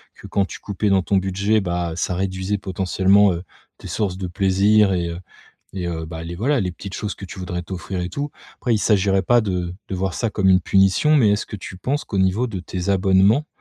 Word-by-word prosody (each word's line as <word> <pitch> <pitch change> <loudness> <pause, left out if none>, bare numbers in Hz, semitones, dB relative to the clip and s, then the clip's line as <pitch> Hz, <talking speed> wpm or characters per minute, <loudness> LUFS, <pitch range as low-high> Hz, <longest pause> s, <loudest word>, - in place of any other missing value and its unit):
que - - -12
quand 100 - +1
tu - - -9
coupais 100 +1 -2
dans 95 -1 +4
ton 100 - 0
budget, 100 +3 +1
bah, 85 -2 -2
ça 90 +1 -1
réduisait 95 +2 -2
potentiellement, 95 +1 +3
heu, 85 +1 -5 0.3
tes - - -10
sources 95 0 -2
de 95 -1 -4
plaisir 100 +3 +3
et 85 -2 -1
heu 85 +1 -5 0.6
et 90 -2 -3
heu, 80 -1 -4
bah, 80 0 -7
les, 85 +1 -6
voilà 130 +7 +1
les 90 - -1
petites 100 +2 -8
choses 105 -1 -3
que - - -9
tu 95 +1 -9
voudrais 90 -1 -4
t'offrir 95 +1 -5
et 90 - -3
tout. 145 +8 -4 0.3
Après 120 - 0
il - - +2
s'agirait 100 -2 +2
pas 120 +6 +4
de 90 -5 -2 0.2
de - - -3
voir 95 0 -2
ça 115 - -1
comme 100 -2 +1
une 90 0 +5
punition, 95 - +3
mais 115 -8 +5
est-ce 105 +1 0
que 105 - -7
tu 95 - -9
penses 140 +10 -2
qu'au 100 - -3
niveau 95 +6 +2
de 100 -5 -5
tes 90 +1 -5
abonnements, 95 +8 +3
95 Hz, 235 wpm, -21 LUFS, 90-105 Hz, 0.6 s, une